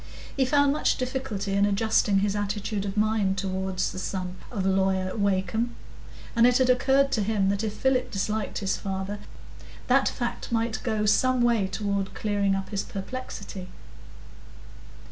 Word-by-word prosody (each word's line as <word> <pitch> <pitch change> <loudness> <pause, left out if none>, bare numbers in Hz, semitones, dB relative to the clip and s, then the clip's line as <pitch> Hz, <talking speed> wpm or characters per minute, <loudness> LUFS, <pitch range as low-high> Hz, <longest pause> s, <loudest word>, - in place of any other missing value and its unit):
He 270 - +2
found 285 +1 +3
much 300 - +1
difficulty 255 -6 -3
in 200 +1 +3
adjusting 205 -1 +2
his 205 0 0
attitude 205 0 -2
of 195 +1 -4
mind 210 -2 +2
toward 190 0 -2
the 185 0 -1
son 185 -1 -4
of 200 -6 -3
Lawyer 190 -1 +1
Wakem, 200 +3 0 0.6
and 235 +1 +6
it 250 0 +4
had 255 -1 +4
occurred 270 +2 +3
to 225 - +1
him 200 -2 +1
that 200 +2 0
if 215 -1 -2
Philip 255 0 +1
disliked 210 +1 -2
his 195 -1 -1
father, 195 +1 -4 0.7
that 265 +2 +4
fact 240 0 -4
might 230 -1 0
go 215 -3 0
some 250 +4 +3
way 230 -5 +3
toward 200 0 -2
clearing 200 -2 +1
up 195 0 -4
his 200 -2 -1
perplexity. 200 -3 -6
205 Hz, 155 wpm, -26 LUFS, 195-240 Hz, 0.7 s, and